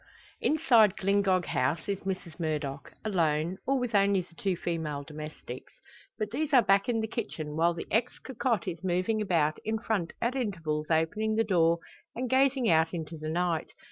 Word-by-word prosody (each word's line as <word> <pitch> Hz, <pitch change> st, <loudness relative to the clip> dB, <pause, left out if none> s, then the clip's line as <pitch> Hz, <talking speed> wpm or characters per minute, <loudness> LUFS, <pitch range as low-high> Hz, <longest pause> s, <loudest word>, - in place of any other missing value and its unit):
Inside 235 Hz, -, +4 dB
Glyngog 195 Hz, -2 st, +2 dB
House 135 Hz, +6 st, 0 dB
is 200 Hz, -1 st, -1 dB
Mrs 185 Hz, -4 st, -5 dB
Murdock, 150 Hz, -4 st, -3 dB
alone, 170 Hz, -2 st, +1 dB
or 275 Hz, +1 st, +3 dB
with 245 Hz, -3 st, -2 dB
only 200 Hz, -1 st, +4 dB
the 175 Hz, -1 st, -16 dB
two 185 Hz, +1 st, -1 dB
female 155 Hz, -5 st, -3 dB
domestics. 155 Hz, +1 st, -9 dB, 0.4 s
But 215 Hz, -2 st, -3 dB
these 300 Hz, +4 st, -2 dB
are 250 Hz, -3 st, +7 dB
back 195 Hz, +5 st, +3 dB
in 225 Hz, -2 st, +1 dB
the 220 Hz, -, -2 dB
kitchen 165 Hz, -10 st, -4 dB
while 170 Hz, +2 st, +2 dB
the 165 Hz, -, -5 dB
ex 235 Hz, +3 st, +1 dB
cocotte 240 Hz, -4 st, -2 dB
is 175 Hz, -1 st, -4 dB
moving 185 Hz, +4 st, 0 dB
about 165 Hz, -6 st, +1 dB
in 220 Hz, +1 st, -1 dB
front 215 Hz, -6 st, -2 dB
at 235 Hz, +3 st, 0 dB
intervals 165 Hz, -, -2 dB
opening 170 Hz, +7 st, +1 dB
the 225 Hz, -, +3 dB
door, 170 Hz, -5 st, +3 dB, 0.4 s
and 250 Hz, +2 st, -2 dB
gazing 265 Hz, -2 st, +3 dB
out 160 Hz, +1 st, +3 dB
into 165 Hz, -1 st, -5 dB
the 155 Hz, 0 st, -5 dB
night. 170 Hz, 0 st, -1 dB
185 Hz, 175 wpm, -29 LUFS, 160-220 Hz, 0.4 s, are